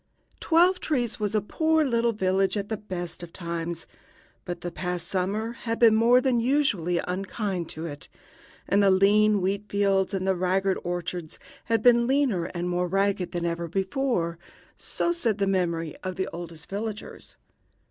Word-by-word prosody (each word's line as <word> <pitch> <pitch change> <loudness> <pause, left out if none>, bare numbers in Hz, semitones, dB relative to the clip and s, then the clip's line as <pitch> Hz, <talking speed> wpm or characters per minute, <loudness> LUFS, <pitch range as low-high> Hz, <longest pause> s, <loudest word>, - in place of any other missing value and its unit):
Twelve 355 +2 +4
trees 240 -8 -1
was 210 0 -1
a 215 - +3
poor 315 +8 +1
little 235 -2 +2
village 195 -1 +1
at 205 0 -3
the 220 - -2
best 175 -5 -5
of 175 -1 -9
times, 170 -1 -4 0.6
but 175 -1 -5
the 175 - -4
past 180 0 -3
summer 200 +4 -1
had 230 -1 -4
been 230 -2 +6
more 230 +3 +5
than 255 -2 +2
usually 230 - +1
unkind 185 0 -3
to 160 +1 -4
it, 145 -3 -7 0.6
and 200 - +3
the 200 - +5
lean 205 +2 +4
wheat 195 +3 -1
fields 195 -1 +1
and 190 0 -2
the 190 - +3
ragged 185 +1 +1
orchards 175 -2 -4 0.3
had 225 -2 +1
been 235 -1 +5
leaner 260 -10 +2
and 175 0 -4
more 180 0 0
ragged 195 0 0
than 175 -1 -2
ever 170 0 -2
before 190 - -1 0.4
so 345 - -1
said 240 - 0
the 200 - +1
memory 170 -5 -1
of 185 -1 -5
the 190 - -2
oldest 165 -2 -8
villagers. 215 +2 -6
195 Hz, 170 wpm, -26 LUFS, 175-225 Hz, 0.6 s, been